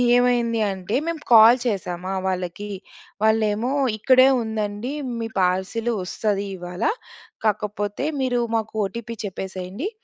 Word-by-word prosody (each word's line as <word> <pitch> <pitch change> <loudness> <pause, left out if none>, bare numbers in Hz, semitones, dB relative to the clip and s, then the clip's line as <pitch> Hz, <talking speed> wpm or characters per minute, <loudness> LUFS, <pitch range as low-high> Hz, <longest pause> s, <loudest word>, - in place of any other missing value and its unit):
ఏమైంది 240 -2 +2
అంటే, 190 +3 -4
మేము 330 -2 -3
కాల్ 230 +2 +9
చేసామా 185 -3 -2
వాళ్ళకి, 185 +2 -3 0.5
వాళ్ళేమో, 220 +2 +2 0.3
"ఇక్కడే 255 +4 +6
ఉందండి 220 +3 -3 0.3
మీ 225 - -2
పార్సెలు 190 +6 0
వస్తది 200 +2 -1
ఇవాళ 180 0 -6 0.6
కాకపోతే 210 +2 -1 0.2
మీరు 245 -2 +1 0.2
మాకు 220 0 -4
ఓటీపీ 230 +3 -6
చెప్పేసేయండి" 190 - -5
215 Hz, 110 wpm, -23 LUFS, 190-235 Hz, 0.6 s, కాల్